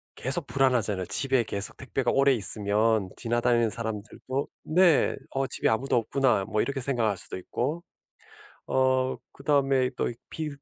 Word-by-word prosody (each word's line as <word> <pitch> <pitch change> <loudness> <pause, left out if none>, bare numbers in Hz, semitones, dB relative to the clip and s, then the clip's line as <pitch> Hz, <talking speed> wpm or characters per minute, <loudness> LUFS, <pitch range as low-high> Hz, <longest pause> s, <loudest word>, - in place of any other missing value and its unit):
계속 140 +5 +2
불안하잖아요. 120 -10 +1
집에 135 +1 +2
계속 100 -1 -1
택배가 130 -1 -2
오래 135 0 +3
있으면 105 -1 +3
지나다니는 120 -1 +1
사람들도 110 +5 -4 0.3
네. 180 -4 +4
'어 135 0 -2
집에 - - +2
아무도 130 +4 0
없구나.' 120 -2 +1
뭐 110 0 -1
이렇게 140 -1 -3
생각할 120 -6 0
수도 - - -4
있고. 140 - -4 0.8
어. 130 0 +1 0.2
그다음에 135 -2 +1
또 - - 0 0.2
비 160 -1 -4
130 Hz, 320 characters per minute, -26 LUFS, 110-135 Hz, 0.8 s, 네